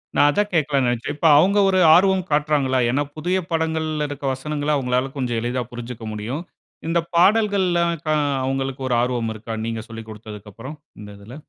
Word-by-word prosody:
நான் 145 - +5
அதான் 205 +6 0
கேக்கலாம்ன்னு 140 -5 +1
நெனச்சேன். 120 +4 -3
இப்போ 165 - +1
அவுங்க 195 +6 +4
ஒரு 190 -1 +2 0.2
ஆர்வம் 190 0 +3
காட்டுறாங்களா? 145 -3 +1
ஏன்னா 145 +3 +1
புதிய 180 +4 0
படங்கள்ல 160 -2 -1
இருக்க 145 0 -7
வசனங்கள, 145 +2 -4
அவுங்களால 125 -1 0
கொஞ்சம் 120 -3 -1
எளிதா 125 +1 -2
புரிஞ்சுக்க 120 -1 -8
முடியும். 115 +9 -4 0.5
இந்த 170 +1 +2 0.2
பாடல்கள்லாம் 185 -3 +3
க - - -3 0.4
அவுங்களுக்கு 135 0 -3
ஒரு 125 - +2
ஆர்வம் 120 -2 -1
இருக்கா? 110 +1 -6
நீங்க 115 -1 -3
சொல்லிக் 115 -1 -9
கொடுத்ததுக்கு 105 -1 -10
அப்புறம், 135 +6 -9 0.2
இந்த 105 - -10
இதில. 110 +5 -12
135 Hz, 165 wpm, -21 LUFS, 120-160 Hz, 0.5 s, நான்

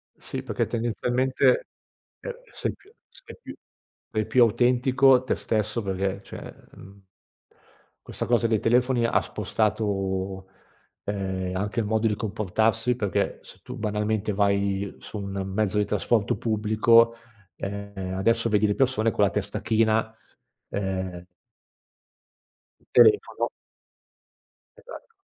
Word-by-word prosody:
Sì, - - -6
perché, - - -1
tendenzialmente, 125 - +1 0.5
ehm, - - -5 0.2
se - - -3
più 405 +2 -23 0.2
sei - - -13
più - - -9 0.6
sei 110 0 0
più 125 -2 +5
autentico 125 +3 +4
a 125 0 +4
te - - 0
stesso 110 +1 -1
perché 95 0 -2
cioè, - - -9 0.2
mhmm 100 0 -15 1.0
questa - - -4
cosa 120 -1 +2
dei 110 -2 +1
telefoni 125 +1 +2
ha 115 - +3
spostato, 95 -3 -2 0.6
ehm, 95 -2 -3
anche 100 +4 -2
il 110 - 0
modo 110 +1 +1
di 105 - 0
comportarsi 110 +3 0
perché 100 -6 -1
se - - -15
tu, 125 0 -8
banalmente, 105 0 -1
vai 100 -1 0
su 105 - -7
un 100 -1 -4
mezzo 105 0 0
di 105 - +2
trasporto 110 -4 0
pubblico, 115 +1 +3 0.4
ehm, 100 -2 -5
adesso 115 +4 +2
vedi 105 0 +3
le 105 - 0
persone 125 -4 +2
con 105 - +1
la 100 - +4
testa 100 0 -3
china, 110 0 +1 0.6
ehm 95 -3 -3 1.7
Telefono. 420 -1 +4 1.3
Esatto. - - -12
110 Hz, 125 wpm, -25 LUFS, 100-115 Hz, 1.7 s, più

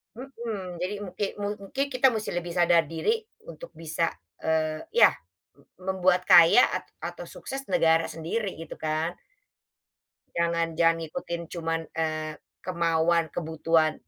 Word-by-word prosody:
Mhm, 225 -8 -6
jadi 180 +4 -2
mungkin 200 +1 -3
mu 205 - -1
mungkin 210 +8 -2
kita 255 -1 +3
mesti 215 -1 -3
lebih 175 -1 -4
sadar 170 -2 +4
diri 440 - -1 0.2
untuk - - -10
bisa, 165 0 -2 0.3
eee, 155 -1 0
ya - - +8 0.5
m 140 - -23 0.2
membuat 185 -1 +2
kaya 170 +8 +9
a - - -1 0.3
atau - - -9
sukses 270 0 -7
negara 165 -12 +3
sendiri 185 +6 -3
gitu 165 - -8
kan. 155 +2 -1 1.2
Jangan 170 -1 +1
jangan 165 0 +5
ikutin 170 -2 -5
cuman, 165 -1 -1
eee, 155 -1 -2 0.3
kemauan 170 -2 +2
kebutuhan, 160 0 +1
170 Hz, 130 wpm, -27 LUFS, 160-200 Hz, 1.2 s, kaya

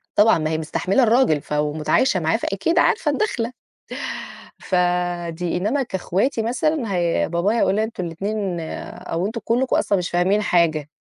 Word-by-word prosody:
طبعًا 215 0 +5
ما 155 -1 -1
هي 160 - 0
مستحملة 185 +9 0
الراجل 225 - +3
ف - - -21
ومتعايشة 150 - +1
معاه، 160 +5 +1
فأكيد 240 - 0
عارفة 335 -5 +2
الدخلة. 255 - -1 1.1
فدي 175 -1 -1
إنّما 225 +10 0
كاخواتي 225 +3 -1
مثلًا 240 -1 -1
هي 170 -1 +1
بابايا 180 +7 +1
هيقول 200 - +2
أنتم 220 -4 -2
الاتنين 195 +2 -3 0.3
أو 170 +3 -4
أنتم 225 +1 -5
كلّكم 250 +4 +1
أصلًا 200 - +2
مش 180 -1 -2
فاهمين 185 +4 +2
حاجة، 165 -7 +1
190 Hz, 145 wpm, -22 LUFS, 170-230 Hz, 1.1 s, طبعًا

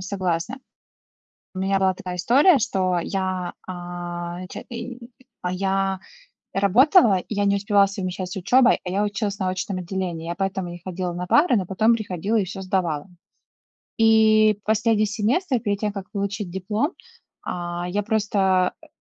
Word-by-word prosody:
согласна. 185 +4 -2 1.0
У - - -6
меня 195 +1 +1
была 190 -1 +2
такая 180 0 -6
история, 275 - +5
что 190 -6 0
я, 185 -1 -2
а, 175 0 -6
ч - - -7
и, 235 +1 -6 0.4
а, 180 - -2
я 195 0 0 0.5
работала, 215 - +5
и 215 - -6
я 205 - +1
не 200 0 +3
успевала 200 -1 +3
совмещать 185 -2 -4
с - - -6
учебой, 245 +7 +4
а 180 - -4
я 195 +3 0
училась 205 0 -2
на 185 -2 -1
очном 185 +1 -3
отделении. 175 -2 -4
Я 170 - -3
поэтому 190 -1 -2
не 175 0 -9
ходила 185 -1 -3
на 180 +1 -4
пары, 295 - +4
но 190 - 0
потом 215 +5 +3
приходила 205 0 -2
и 205 - +2
всё 195 +1 -7
сдавала. 180 -5 -1 0.9
И 215 -1 +5
последний 220 0 +2
семестр 240 - 0
перед 205 -3 -2
тем, 210 -1 -2
как 195 -2 -7
получить 200 -2 -3
диплом, 210 - -1 0.5
а, 175 0 -4
я 205 +3 -1
просто, 195 -4 +1
э, 315 - -15
195 Hz, 160 wpm, -23 LUFS, 180-215 Hz, 1.0 s, история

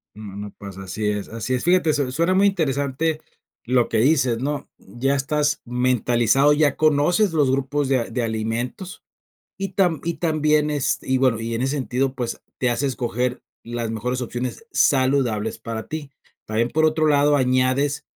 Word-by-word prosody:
No 105 -2 -9
no 105 0 -6
pasa, 95 -1 -9
así 100 +3 -3
es, 105 -1 -3
así 115 +3 -3
es. 125 - -1
Fíjate, 175 -3 +3
su 140 -3 -1
suena 170 +7 +1
muy 195 +2 +4
interesante 155 -3 -1 0.4
lo 125 0 +2
que 115 - 0
dices, 130 -3 +3
¿no? 145 +3 -3
Ya 120 +7 -2
estás 150 +2 0
mentalizado, 125 +2 +2
ya 145 -2 +2
conoces 155 +6 +3
los 145 -5 +3
grupos 140 +1 0
de 135 - +3
a 115 - -2
de 120 +1 -3
alimentos, 115 - -4 0.6
y 195 0 -3
tam 175 -6 +2
y 170 0 -2
también 155 -2 +1
es 145 -3 0
y 130 0 0
bueno, 125 -4 +2
y 115 +1 -3
en 115 - -1
ese 135 +3 0
sentido, 130 0 -1
pues, 120 -3 -4 0.2
te 125 - +1
hace 130 +4 0
escoger 125 -1 -2 0.2
las 120 -1 -4
mejores 125 +3 -2
opciones 125 - -5
saludables 130 -6 +2
para 115 -1 -6
ti. 155 -3 -6 0.4
También, 115 +2 0
por 155 +1 +2
otro 155 0 +1
lado, 145 0 +4
añades 130 +3 +1
130 Hz, 175 wpm, -22 LUFS, 120-150 Hz, 0.6 s, muy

